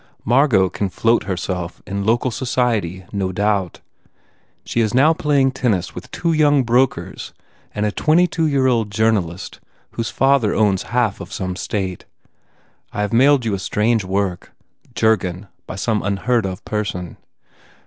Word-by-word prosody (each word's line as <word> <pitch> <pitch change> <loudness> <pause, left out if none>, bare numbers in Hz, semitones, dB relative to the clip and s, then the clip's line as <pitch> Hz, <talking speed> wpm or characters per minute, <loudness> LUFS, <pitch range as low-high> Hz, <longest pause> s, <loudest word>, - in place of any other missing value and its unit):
Margot 120 -5 +4
can 100 +2 -3
float 115 +4 +1
herself 90 -2 -4
in 100 +1 -3
local 120 +4 +1
society 115 -8 -1
no 95 -2 -2
doubt. 100 -1 -1 0.8
She 120 - 0
is 110 0 0
now 150 +5 +5
playing 145 -4 +2
tennis 115 -8 -1
with - - -9
two 170 -1 -1
young 145 -3 +4
brokers 125 +2 0 0.4
and 105 - 0
a 105 - 0
22 165 - +2
year 140 -3 +1
old 115 -5 +2
journalist 100 -5 -1 0.3
whose 115 -1 -3
father 135 -2 +2
owns 100 -4 +2
half 120 -4 0
of 90 - -9
some 95 -2 -4
State. 95 -2 -4 0.9
I 105 - -3
have 105 +1 -2
mailed 135 +1 +4
you 110 - 0
a 100 - -2
strange 110 +3 +1
work, 95 -1 -2 0.4
Jurgen 100 -4 +1 0.2
by - - -6
some 105 +2 0
unheard 100 +3 0
of 95 -1 -7
person. 100 -5 -4
110 Hz, 150 wpm, -20 LUFS, 95-125 Hz, 0.9 s, now